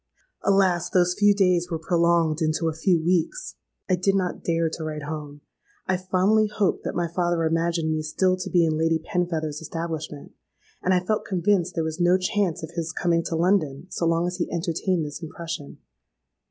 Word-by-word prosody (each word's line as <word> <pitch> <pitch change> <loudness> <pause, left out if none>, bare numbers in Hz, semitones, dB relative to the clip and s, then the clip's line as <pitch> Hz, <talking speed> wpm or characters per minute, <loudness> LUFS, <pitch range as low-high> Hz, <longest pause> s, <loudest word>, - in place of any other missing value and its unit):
"Alas! 190 -3 +2
those 180 -1 +3
few 205 +2 +4
days 180 -3 +2
were 165 - -2
prolonged 170 -1 +2
into 160 +1 +1
a 160 - 0
few 170 +2 +2
weeks. 180 - 0 0.3
I 185 - +3
did 195 +2 +1
not 185 -2 -1
dare 165 -1 +1
to 160 0 -5
write 155 -1 -4
home: 145 -1 -6 0.4
I 185 - +1
fondly 185 +4 +2
hoped 210 -2 0
that - - -3
my 175 -1 0
father 175 0 0
imagined 165 0 0
me 155 0 0
still 185 +4 +1
to 185 - -5
be 175 -2 +4
in 155 -1 0
Lady 165 0 +2
Penfeather's 160 -2 -2
establishment; 160 -2 -5 0.5
and 185 - +1
I 180 -1 +3
felt 215 +2 0
convinced 180 -1 +1
there 165 - 0
was 160 +1 -4
no 175 +1 +5
chance 185 -3 -1
of 160 - -6
his 165 -1 -3
coming 170 0 +1
to 165 - -2
London 165 -5 +1
so 170 - -1
long 165 +1 +2
as 180 0 -3
he 175 - -2
entertained 170 0 -1
this 145 +4 -7
impression. 160 -3 -7
170 Hz, 190 wpm, -24 LUFS, 160-185 Hz, 0.5 s, no